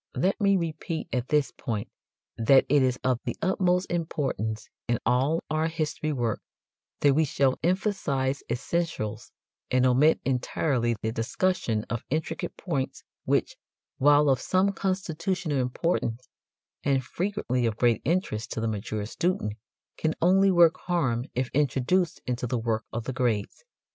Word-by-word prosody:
Let 195 +4 +1
me 200 -1 +4
repeat 165 -1 -3
at 125 0 -1
this 150 -2 +2
point 110 -5 -4 0.5
that 130 +4 +5
it 145 +1 +4
is 130 -1 +2
of 130 -2 +1
the - - -3
utmost 180 0 +1
importance 135 -10 -2 0.2
in 120 -1 +2
all 135 +7 +2
our 155 +1 +1
history 155 -1 -2
work 120 -6 -1 0.6
that 145 -1 +5
we 155 +3 +3
shall 135 -2 +1
emphasize 155 -8 0
essentials 120 -4 -2 0.4
and 130 0 +3
omit 135 +5 +4
entirely 125 -2 0
the 110 - 0
discussion 115 - 0
of 115 - -3
intricate 155 +3 -3
points 140 -8 -3 0.2
which, - - +1 0.4
while 145 +2 +5
of 135 -3 +3
some 190 +2 +2
constitutional 185 -4 -1
importance, 125 -2 -1 0.6
and 135 -2 +2
frequently 165 - -1
of 110 -1 -2
great 120 -3 +3
interest 130 - -1
to - - -3
the 115 - -1
mature 105 0 -3
student, 170 - -1 0.4
can 160 0 0
only 190 +3 +5
work 170 -2 +5
harm 130 -9 +1
if 130 0 -1
introduced 150 +5 +1
into 125 0 -2
the 125 - -1
work 115 -1 -1
of 115 0 -3
the 130 - -4
grades. 120 - -1
135 Hz, 145 wpm, -27 LUFS, 120-170 Hz, 0.6 s, that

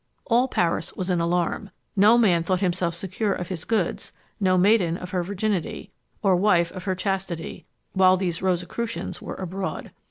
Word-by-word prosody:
All 245 +2 +3
Paris 165 -7 0
was 185 0 -2
in 175 -2 +1
alarm. 175 +3 0 0.3
No 210 +4 +6
man 190 -8 +4
thought 180 +2 0
himself 175 -2 0
secure 195 +3 -2
of 180 -2 -5
his 175 -4 -5
goods, 215 -7 -1 0.3
no 185 -2 +3
maiden 180 -3 +3
of 180 0 -8
her 180 - 0
virginity, 195 0 -2 0.3
or 195 -2 +4
wife 175 -3 +3
of 185 - -8
her 190 -2 0
chastity, 190 -3 -3 0.3
while 185 -1 +5
these 180 -3 -2
Rosicrucians 185 +5 -2
were - - -6
abroad. 190 +1 -5
185 Hz, 165 wpm, -24 LUFS, 175-200 Hz, 0.3 s, No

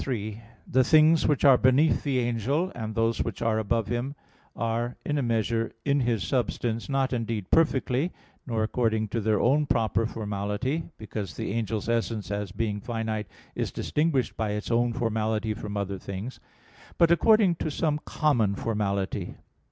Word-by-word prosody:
3: 110 -4 -4 0.3
The 130 +1 +3
things 155 +3 +5
which 145 -1 +2
are 135 -3 +7
beneath 130 +5 +4
the 140 -3 0
angel, 125 - 0
and 110 -2 -5
those 115 0 +1
which - - -5
are 110 -1 +2
above 110 +1 0
him, 120 +6 -3 0.4
are 115 +1 -1
in 150 0 0
a - - +1
measure 115 -1 0
in 140 0 +3
his 120 -6 0
substance, 115 - -1
not 135 -1 +1
indeed 115 -5 -3
perfectly, 145 0 +2 0.4
nor 115 -3 0
according 110 -1 0
to 115 +3 -1
their 105 -1 +2
own 145 +4 +3
proper 115 -1 +1
formality 105 +8 -3
because 100 -7 -6
the - - -3
angel's 110 -2 -2
essence, 115 -3 -1
as 100 -2 -3
being 105 0 -2
finite, 110 -2 -3 0.3
is - - -2
distinguished 150 -5 0
by 110 -2 -1
its 105 +3 -4
own 120 +1 +2
formality 110 -2 -1
from 105 -1 -6
other 100 -1 -3
things 100 +7 -6 0.6
but 170 -1 +5
according 210 +1 +5
to 155 - -2
some 150 0 0
common 120 -10 +1
formality. 100 -3 -2
115 Hz, 160 wpm, -27 LUFS, 110-130 Hz, 0.6 s, are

